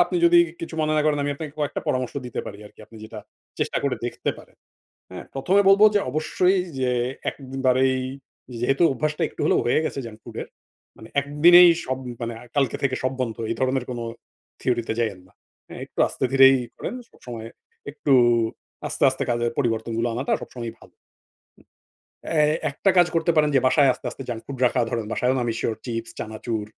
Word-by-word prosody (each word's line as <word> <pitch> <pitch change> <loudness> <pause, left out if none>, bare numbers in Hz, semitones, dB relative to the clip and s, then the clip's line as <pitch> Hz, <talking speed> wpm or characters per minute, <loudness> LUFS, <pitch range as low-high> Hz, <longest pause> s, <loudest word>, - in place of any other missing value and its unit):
আপনি 180 +1 -3
যদি 170 0 +7 0.2
কিছু 165 -1 -6
মনে 155 0 +1
না - - +3
করেন 150 -1 +2
আমি 145 - -1
আপনাকে 150 0 -7
কয়েকটা 145 -1 -2
পরামর্শ 130 -1 -1
দিতে 120 - -4
পারি 100 - -8
আরকি 105 - -18
আপনি 115 - -15
যেটা 110 0 -9 0.4
চেষ্টা - - 0
করে 140 - 0
দেখতে - - -2
পারেন। - - -17 0.5
হ্যাঁ, - - -8
১ম 135 +8 -1
এ - - +4
বলবো 200 +2 +7
যে 205 - +4
অবশ্যই 180 +6 +1 0.2
যে 125 - +1 0.4
একবারেই 130 -1 0 0.6
যেহেতু 135 +6 +1
অভ্যাসটা 155 +5 -2
একটু - - -11
হলেও - - +3
হয়ে 120 - +2
গেছে 140 - -3
জাংক 110 -1 -10
ফুড - - -11
এর। - - -11 0.5
মানে 110 - -13
একদিনেই 170 +5 +7
সব 130 0 -2 0.2
মানে 115 0 -3 0.2
কালকে 135 -4 +1
থেকে 130 -2 +1
সব 130 +1 0
বন্ধ। 115 -3 -2
এই - - 0
ধরনের 130 -1 +1
কোন 120 - -4 0.6
থিওরি 120 -2 0
তে - - +1
যাইয়েন 110 -6 -1
না। 95 - -25 0.4
হ্যাঁ - - -9
একটু - - -22
আস্তে - - -4
ধীরেই 135 0 +7 0.2
করেন। 215 - -5 0.2
সবসময় 115 -2 -9 0.4
একটু 145 -1 -1 0.7
আস্তে, - - -1
আস্তে 130 - -4
কাজের 120 0 0
পরিবর্তনগুলো 115 -2 0
আনাটা 130 +4 -2
সবসময়ই 115 -2 -7
ভালো। - - -17 1.4
অ্যা 155 -2 +2 0.3
একটা 165 +7 +1
কাজ 175 - +7
করতে 165 +1 +2
পারেন 150 -1 +4
যে - - +5
বাসায় 135 +1 +5
আস্তে, - - -9
আস্তে - - -8
জাঙ্ক 115 -2 -4
ফুড 135 -2 -7
রাখা 125 - +1
ধরেন। 115 -2 -2
বাসায়ও 125 +1 +1
না - - 0
আমি 120 - -1
সিউর 110 - -2
চিপস, 115 -2 -4
চানাচুর 110 0 -4
130 Hz, 190 wpm, -23 LUFS, 120-150 Hz, 1.4 s, যদি